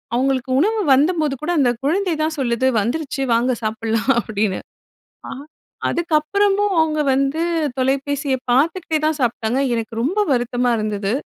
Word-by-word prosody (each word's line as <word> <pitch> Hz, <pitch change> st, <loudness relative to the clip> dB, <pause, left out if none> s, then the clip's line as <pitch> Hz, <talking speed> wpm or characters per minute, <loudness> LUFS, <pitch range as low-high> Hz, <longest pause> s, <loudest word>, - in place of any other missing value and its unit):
அவுங்களுக்கு 260 Hz, 0 st, 0 dB
உணவு 435 Hz, +6 st, +1 dB
வந்தபோதுகூட 305 Hz, +1 st, +1 dB
அந்த 245 Hz, -3 st, +3 dB
குழந்தைதான் 320 Hz, -1 st, 0 dB
சொல்லுது 245 Hz, 0 st, 0 dB
"வந்துருச்சு, 275 Hz, +4 st, -3 dB
வாங்க 245 Hz, +2 st, +1 dB
சாப்பிடலாம்!" 225 Hz, +3 st, 0 dB
அப்படின்னு, 210 Hz, -3 st, -2 dB, 0.7 s
ஆ -, -, -7 dB, 0.6 s
அதுக்கப்புறமும். 390 Hz, +5 st, +1 dB
அவுங்க 310 Hz, -1 st, +1 dB
வந்து 275 Hz, +4 st, 0 dB, 0.4 s
தொலைபேசிய 275 Hz, +1 st, 0 dB, 0.2 s
பாத்துக்கிட்டே 315 Hz, +5 st, +1 dB
தான் 310 Hz, -1 st, 0 dB
சாப்ட்டாங்க. 240 Hz, 0 st, 0 dB, 0.2 s
எனக்கு 225 Hz, 0 st, -4 dB
ரொம்ப 360 Hz, +11 st, -1 dB
வருத்தமா 245 Hz, 0 st, 0 dB
இருந்தது! 210 Hz, -1 st, -2 dB
270 Hz, 115 wpm, -20 LUFS, 240-315 Hz, 0.7 s, அந்த